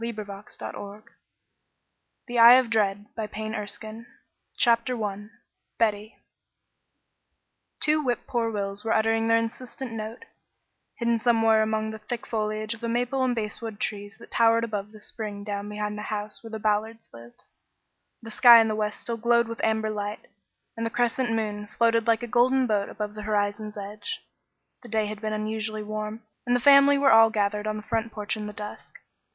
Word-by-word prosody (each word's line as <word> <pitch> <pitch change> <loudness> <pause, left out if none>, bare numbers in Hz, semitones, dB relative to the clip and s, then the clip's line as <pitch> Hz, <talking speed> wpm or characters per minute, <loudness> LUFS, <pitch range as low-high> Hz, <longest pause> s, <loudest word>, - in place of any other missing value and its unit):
THE 230 - -2
SAME 235 - -5
BOY 215 -1 -5 0.3
499 205 +1 -8 1.2
THE 240 -2 -2
EYE 235 +1 +10
OF 255 -2 +4
DREAD 205 -2 +1
BOOK 215 -2 -5 0.4
ONE 220 +2 -9 0.5
CHAPTER 235 -1 +2
I 205 +1 -6 0.5
BETTY 215 -1 0 1.6
Two 305 0 +3
whip 245 -4 -1
poor 235 -1 -1
wills 200 -1 -3
were 225 - 0
uttering 225 +1 +2
their 230 0 +4
insistent 240 +2 -5
note, 220 +1 -6 0.7
hidden 235 -1 +1
somewhere 225 -2 +3
among 220 0 -1
the 220 - -8
thick 230 +3 -5
foliage 215 0 -2
of 230 - -12
the 230 - -2
maple 245 +3 0
and 250 -1 +1
basswood 220 0 -4
trees 205 -1 -4
that - - -15
towered 230 0 +4
above 210 -2 -4
the 215 - -14
spring 210 -1 -6
down 205 0 -4
behind 210 0 -4
the 210 - -6
house 210 0 -4
where 225 - -10
the 220 - -5
Ballards 215 +1 -1
lived. 115 +1 -14 0.8
The 225 - -8
sky 235 +1 +9
in 225 -1 +3
the 215 - -1
west 210 -1 -2
still 235 -1 -3
glowed 235 +1 +3
with 230 0 -6
amber 220 0 +1
light, 205 0 -5 0.5
and 230 - -4
the 230 - 0
crescent 240 +1 0
moon 210 -2 -2
floated 230 -1 +3
like 230 +1 +2
a - - -3
golden 255 +3 +3
boat 210 -4 0
above 210 0 -5
the 215 - -7
horizon's 210 0 -2
edge. 210 - -6 0.6
The 240 - -13
day 220 0 +1
had 210 0 -6
been 215 -1 -2
unusually 215 0 -3
warm, 215 +1 -5 0.2
and 245 - +3
the - - +2
family 280 +2 +7
were 280 -1 +4
all 225 0 +7
gathered 210 0 -1
on 215 0 -2
the 210 - -7
front 225 +1 -2
porch 210 +1 -3
in 210 -1 -5
the - - -6
dusk. 210 0 -8
220 Hz, 180 wpm, -26 LUFS, 210-230 Hz, 1.6 s, EYE